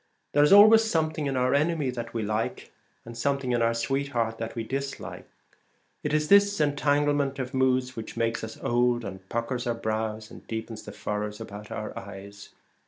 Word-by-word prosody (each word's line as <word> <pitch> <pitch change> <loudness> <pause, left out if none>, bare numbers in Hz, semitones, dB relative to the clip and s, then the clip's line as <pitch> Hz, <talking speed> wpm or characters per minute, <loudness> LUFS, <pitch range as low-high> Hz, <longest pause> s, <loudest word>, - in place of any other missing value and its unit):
There 145 - +5
is 150 - +4
always 215 +3 +9
something 155 -7 0
in 135 -1 -1
our 125 +1 +2
enemy 150 -2 +1
that 120 -2 -6
we 115 -2 -2
like, 110 +2 -3 0.3
and 115 0 -9
something 135 +1 -1
in 120 -1 +1
our 115 0 +2
sweetheart 120 -2 -1
that 115 0 -5
we 115 - -2
dislike. 135 +3 -5 0.7
It - - -2
is 150 0 +1
this 200 +1 +5
entanglement 145 -1 +1
of 130 0 -4
moods 130 -1 +1
which 115 0 -7
makes 115 0 0
us 110 - -6
old, 120 -1 +2
and 95 0 -8
puckers 120 +1 -2
our 120 - 0
brows 110 -1 -3
and - - -13
deepens 110 0 -5
the - - -7
furrows 105 0 -4
about 105 -1 -9
our 110 - -5
eyes. 100 +1 -9
120 Hz, 180 wpm, -27 LUFS, 110-140 Hz, 0.7 s, always